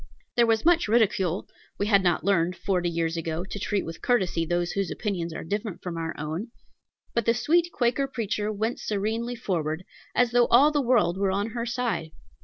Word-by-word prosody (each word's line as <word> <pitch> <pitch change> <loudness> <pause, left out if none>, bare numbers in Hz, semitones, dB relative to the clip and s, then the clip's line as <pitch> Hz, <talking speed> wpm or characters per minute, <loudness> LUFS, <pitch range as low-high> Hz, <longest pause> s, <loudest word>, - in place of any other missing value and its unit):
There 235 -1 +4
was 225 +2 +2
much 345 -4 +4
ridicule, 205 -5 +2 0.3
we 205 - 0
had 200 -2 +4
not 175 -3 +1
learned, 180 -2 +2
forty 180 -2 0
years 165 0 -1
ago, 165 +1 -3
to 205 - -6
treat 200 0 -1
with 165 - -8
courtesy 180 -9 +1
those 175 +1 0
whose 195 -2 -1
opinions 180 -6 -3
are 160 - -6
different 205 +2 -4
from 180 -2 -4
our 165 -1 -3
own, 155 +8 -4 0.7
but 235 -2 0
the 230 - +4
sweet 335 +8 +2
Quaker 250 +1 +1
preacher 215 -4 -2
went 220 +3 -2
serenely 220 +4 -2
forward, 170 -7 -2 0.3
as 245 -1 +3
though 240 0 +4
all 275 +6 +6
the 295 -1 +1
world 230 -9 +2
were 200 -1 +2
on 200 +3 -1
her 235 +1 -3
side. 235 -9 -2
205 Hz, 195 wpm, -26 LUFS, 175-235 Hz, 0.7 s, all